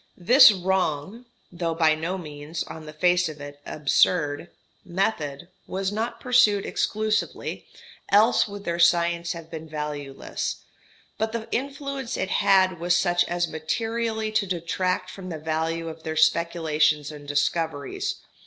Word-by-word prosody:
This 245 Hz, +7 st, +8 dB
wrong 190 Hz, +3 st, -1 dB, 0.2 s
(though 170 Hz, -2 st, -2 dB
by 160 Hz, -2 st, +4 dB
no 165 Hz, +5 st, -3 dB
means, 155 Hz, -1 st, -6 dB
on 160 Hz, -1 st, -10 dB
the -, -, -7 dB
face 180 Hz, +2 st, +2 dB
of 155 Hz, -1 st, -9 dB
it, 145 Hz, 0 st, -10 dB
absurd) 150 Hz, +1 st, +1 dB, 0.3 s
method 170 Hz, -5 st, -2 dB, 0.2 s
was 190 Hz, +1 st, -2 dB
not 220 Hz, +3 st, -3 dB
pursued 245 Hz, -6 st, +3 dB
exclusively, 215 Hz, 0 st, -2 dB, 0.4 s
else 215 Hz, +4 st, +5 dB
would 200 Hz, -1 st, -8 dB
their 170 Hz, -2 st, -2 dB
science 170 Hz, 0 st, +3 dB
have 165 Hz, -1 st, -10 dB
been 160 Hz, -1 st, -7 dB
valueless, 150 Hz, -3 st, -5 dB, 0.6 s
but 220 Hz, +1 st, -1 dB
the 230 Hz, -1 st, -4 dB
influence 275 Hz, -1 st, -3 dB
it 190 Hz, -, -2 dB
had 185 Hz, -3 st, +3 dB
was 175 Hz, +1 st, +2 dB
such 175 Hz, -1 st, +3 dB
as 175 Hz, 0 st, -1 dB
materially 220 Hz, +7 st, -2 dB
to 215 Hz, -2 st, +1 dB
detract 185 Hz, +1 st, -1 dB
from 185 Hz, -2 st, -8 dB
the 165 Hz, -, -4 dB
value 160 Hz, +1 st, -2 dB
of 160 Hz, 0 st, -8 dB
their 160 Hz, 0 st, -4 dB
speculations 160 Hz, -2 st, +2 dB
and 145 Hz, -1 st, -11 dB
discoveries. 145 Hz, 0 st, -1 dB
170 Hz, 140 wpm, -25 LUFS, 155-200 Hz, 0.6 s, This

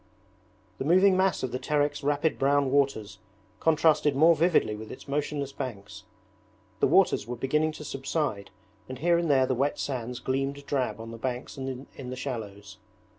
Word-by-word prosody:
The -, -, -1 dB
moving 185 Hz, +5 st, +5 dB
mass 190 Hz, -4 st, +1 dB
of 130 Hz, -, -2 dB
the 125 Hz, -, -3 dB
Terek's 145 Hz, 0 st, 0 dB
rapid 145 Hz, +2 st, 0 dB
brown 140 Hz, 0 st, +2 dB
waters 110 Hz, -8 st, 0 dB, 0.4 s
contrasted 155 Hz, -2 st, +3 dB
more 165 Hz, +4 st, +6 dB
vividly 160 Hz, -9 st, +2 dB
with 110 Hz, +1 st, -9 dB
its -, -, -11 dB
motionless 145 Hz, 0 st, -2 dB
banks. 100 Hz, -7 st, -7 dB, 0.7 s
The -, -, +4 dB
waters -, -, +3 dB
were 125 Hz, -, -4 dB
beginning 150 Hz, +6 st, 0 dB
to 150 Hz, -, -9 dB
subside 135 Hz, -7 st, -3 dB, 0.4 s
and 130 Hz, -, -6 dB
here 170 Hz, +5 st, +2 dB
and 170 Hz, -2 st, -1 dB
there 135 Hz, -2 st, +4 dB
the 130 Hz, -, 0 dB
wet 135 Hz, +3 st, 0 dB
sands 125 Hz, -3 st, -4 dB
gleamed 135 Hz, +2 st, -2 dB
drab 125 Hz, -6 st, -1 dB
on 115 Hz, 0 st, -8 dB
the 115 Hz, -, -9 dB
banks 125 Hz, +1 st, -4 dB
and 135 Hz, 0 st, -5 dB
in 130 Hz, -2 st, -8 dB
the 130 Hz, -, -4 dB
shallows. 105 Hz, -7 st, -6 dB
135 Hz, 175 wpm, -27 LUFS, 125-150 Hz, 0.7 s, more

